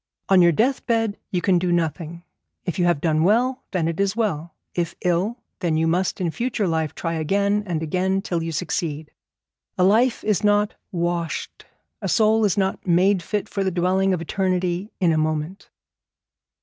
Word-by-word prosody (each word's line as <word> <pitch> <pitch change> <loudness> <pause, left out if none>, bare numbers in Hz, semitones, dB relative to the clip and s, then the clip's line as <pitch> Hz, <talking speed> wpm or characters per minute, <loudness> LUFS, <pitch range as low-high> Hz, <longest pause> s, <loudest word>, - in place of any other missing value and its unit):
On 190 -2 +6
your 170 0 +6
death 250 - +1
bed 225 -3 0
you 180 -2 -2
can 185 -3 +3
do 180 0 0
nothing. 170 0 -2 0.4
If 180 +1 -3
you 175 - +3
have 175 -5 +2
done 155 -2 +2
well, 245 +7 +2
then 175 -4 -1
it 165 +1 -3
is 200 0 +1
well; 175 -8 -2 0.2
if 170 -2 -2
ill, 180 +6 0 0.2
then 165 -4 0
you 160 - +2
must 175 +3 0
in 175 -3 -1
future 235 -1 -1
life 160 -2 -1
try 165 -1 -3
again 200 +6 +1
and 165 -3 -2
again 190 +4 0
till 170 -4 -2
you 165 0 -3
succeed. 155 -2 -3 0.7
A 180 - +3
life 225 +6 +3
is 210 -3 +1
not 205 0 +3 0.2
washed, 170 -2 -3 0.4
a - - -2
soul 220 0 +3
is 200 - +1
not 190 0 -1
made 180 +2 +3
fit 210 +4 -3
for 195 - -2
the 190 - +1
dwelling 185 +2 +1
of 180 -3 0
eternity, 185 +2 -1
in 175 -3 +3
a 155 - +2
moment. 155 +4 -2
180 Hz, 185 wpm, -23 LUFS, 165-200 Hz, 0.7 s, On